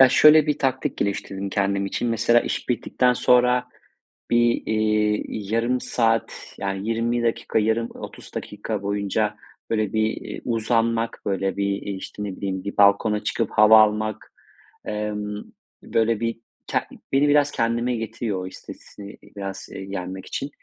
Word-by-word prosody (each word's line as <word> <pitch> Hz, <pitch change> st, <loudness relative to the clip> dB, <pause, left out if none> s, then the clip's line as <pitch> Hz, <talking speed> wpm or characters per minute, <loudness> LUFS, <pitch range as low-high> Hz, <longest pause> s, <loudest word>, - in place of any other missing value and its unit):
Ya 130 Hz, -, +9 dB
şöyle 150 Hz, +3 st, +7 dB
bir 150 Hz, -, 0 dB
taktik 130 Hz, -1 st, -1 dB
geliştirdim 100 Hz, 0 st, -3 dB
kendim 100 Hz, 0 st, 0 dB
için: 120 Hz, +4 st, -2 dB
Mesela 115 Hz, +1 st, +3 dB
iş -, -, -4 dB
bittikten 125 Hz, +1 st, +1 dB
sonra 125 Hz, 0 st, +3 dB, 0.6 s
bir, 120 Hz, 0 st, +3 dB
iii, 105 Hz, -1 st, 0 dB
yarım 120 Hz, +2 st, +1 dB
saat, 115 Hz, -2 st, -1 dB
yani 100 Hz, +2 st, -3 dB
20 115 Hz, +1 st, 0 dB
dakika, 115 Hz, -1 st, 0 dB
yarım 110 Hz, +2 st, +1 dB
30 -, -, -10 dB
dakika 105 Hz, 0 st, -4 dB
boyunca 100 Hz, +1 st, -1 dB, 0.3 s
böyle 110 Hz, -3 st, 0 dB
bir, 110 Hz, 0 st, +2 dB, 0.2 s
eee, -, -, -7 dB
uzanmak, 115 Hz, 0 st, 0 dB
böyle 95 Hz, 0 st, -1 dB
bir, 100 Hz, -, 0 dB, 0.2 s
eee, 100 Hz, -, -5 dB
işte, 95 Hz, +2 st, -7 dB
ne 100 Hz, -2 st, -4 dB
bileyim, 95 Hz, -2 st, -3 dB
bir 100 Hz, -, -6 dB
balkona 105 Hz, +1 st, +4 dB
çıkıp 105 Hz, 0 st, -1 dB
hava 110 Hz, +1 st, +7 dB
almak, 110 Hz, 0 st, 0 dB, 0.5 s
emm, 105 Hz, -1 st, -3 dB, 0.4 s
böyle 115 Hz, -1 st, +1 dB
bir 115 Hz, 0 st, -2 dB, 0.3 s
ke -, -, +1 dB, 0.3 s
beni 140 Hz, +2 st, +4 dB
biraz 145 Hz, 0 st, +4 dB
kendime 120 Hz, +1 st, 0 dB
getiriyor, 110 Hz, -4 st, -3 dB
o -, -, -6 dB
stresi, 100 Hz, +2 st, -11 dB, 0.2 s
biraz, 100 Hz, -1 st, -6 dB
eee, 95 Hz, -, -7 dB
yenmek 95 Hz, -1 st, -5 dB
için. 140 Hz, -, -4 dB
110 Hz, 150 wpm, -23 LUFS, 100-120 Hz, 0.6 s, Ya